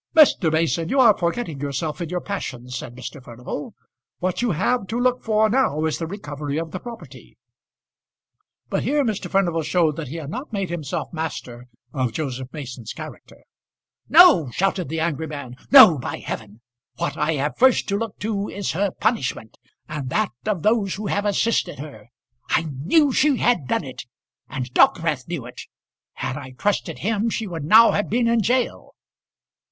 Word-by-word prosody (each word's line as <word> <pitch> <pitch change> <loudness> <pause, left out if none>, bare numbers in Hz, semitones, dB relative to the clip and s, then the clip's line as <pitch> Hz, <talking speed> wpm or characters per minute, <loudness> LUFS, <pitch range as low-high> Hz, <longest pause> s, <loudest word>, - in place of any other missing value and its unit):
"Mr. 275 - +5
Mason, 165 +1 0
you 275 - +1
are 230 -5 +7
forgetting 170 - -2
yourself 145 +4 -3
in 170 - -3
your 180 0 -2
passion," 130 -11 -5
said 120 -1 -6
Mr. 130 +2 -8
Furnival. 125 +4 -7 0.4
"What 185 +3 -2
you 245 - +1
have 195 +5 0
to 230 +2 -2
look 250 0 +1
for 220 -1 +2
now 215 - +1
is 160 - -1
the 165 - -3
recovery 145 -6 -5
of 165 0 -3
the 185 - -5
property." 235 +1 -11 1.3
But - - -1
here 290 -1 +1
Mr. 215 -4 -2
Furnival 175 -4 +1
showed 160 -1 +1
that 160 - -5
he 145 - -7
had 155 -3 -6
not 255 - -6
made 195 -4 -3
himself 160 -3 -4
master 125 -7 -5 0.3
of 130 -5 -1
Joseph 130 -2 -4
Mason's 125 -7 -7
character. - - -11 0.7
"No," 320 - +7
shouted 185 +3 -1
the 160 +1 -2
angry 160 -1 -1
man; 140 -5 -7
"no, 255 - +9
by - - -4
heaven. 110 0 -7 0.3
What 170 - -2
I 160 - 0
have 145 0 -1
first 260 0 +4
to 200 - +1
look 225 -3 -5
to 205 -1 -2
is 200 -2 -3
her 195 +4 0
punishment, 130 - -2 0.3
and 145 -4 -5
that 215 +9 0 0.2
of 200 -7 -1
those 215 -3 +2
who 210 +2 -6
have 205 +1 -1
assisted 205 +2 +1
her. 135 -7 -10 0.4
I - - +2
knew 165 - +2
she 275 +1 +3
had 235 - +1
done - - 0
it, - - -9 0.4
and 130 -1 -5
Dockwrath 165 -3 +3
knew 165 -8 -4
it. 125 - -9 0.5
Had 130 - -4
I 130 -3 -9
trusted 205 0 -1
him, 220 +2 0
she 225 0 -2
would 165 -6 -5
now 225 +7 +7
have 205 - -1
been 235 +2 +1
in 230 0 +3
gaol." 245 +4 -1
170 Hz, 180 wpm, -22 LUFS, 145-215 Hz, 1.3 s, no